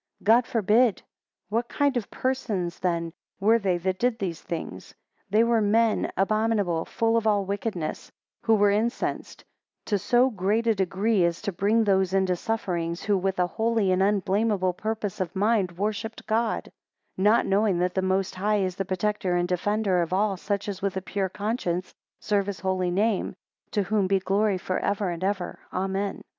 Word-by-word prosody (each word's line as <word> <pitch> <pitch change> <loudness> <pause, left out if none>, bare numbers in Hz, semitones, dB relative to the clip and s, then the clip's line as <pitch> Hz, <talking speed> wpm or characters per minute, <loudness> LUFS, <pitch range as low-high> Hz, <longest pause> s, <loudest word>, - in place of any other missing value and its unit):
God 230 +3 +4
forbid. 225 -1 +3
10 - - -19 0.4
What 230 +3 -1
kind 285 -2 +1
of 240 -4 -2
persons 215 -10 -2
then 170 -2 -1 0.3
were 220 +4 +4
they 190 -4 +1
that 185 +2 -2
did 245 -2 +1
these 175 -6 -4
things? 170 -2 -6 0.3
They 215 +3 +4
were 235 -1 +2
men 220 +2 +2
abominable, 205 -4 +1
full 230 0 +1
of 225 -1 0
all 205 -2 +2
wickedness; 200 -4 -4 0.3
who 225 - +3
were 205 -1 +4
incensed; 220 +4 -2 0.4
to 205 -2 0
so 250 +6 +3
great 210 +3 0
a 225 - +4
degree, 195 +1 +1
as 170 0 +1
to 200 - -1
bring 205 +5 +2
those 190 -2 +2
into 190 -1 +2
sufferings, 175 -5 -2
who 205 -1 +2
with 190 0 -1
a 180 - +3
holy 220 0 0
and 185 +1 +2
unblameable 200 -1 +1
purpose 215 0 -4
of 185 0 -3
mind 200 -2 +1
worshipped 215 +3 -3
God: 225 +1 -1 0.4
not 210 +5 +3
knowing 200 -1 +2
that 180 +1 0
the 190 - 0
Most 190 0 0
High 205 +2 +1
is 185 0 -3
the 195 - -2
protector 185 0 -1
and 175 0 +1
defender 190 +1 +1
of 170 0 -3
all 195 +1 +1
such 200 +2 -3
as 200 -2 -5
with 195 -1 -1
a - - -2
pure 195 -1 -2
conscience 200 -3 -3 0.3
serve 205 -2 0
his 195 -4 -5
holy 185 -1 0
name: 205 +3 0 0.3
to 205 - 0
whom 200 0 +1
be 195 +1 +3
glory 195 +1 +1
for 185 +1 -2
ever 200 -2 -1
and 170 +1 -5
ever, 190 -2 -2
Amen. 195 +1 -2
200 Hz, 180 wpm, -26 LUFS, 185-220 Hz, 0.4 s, God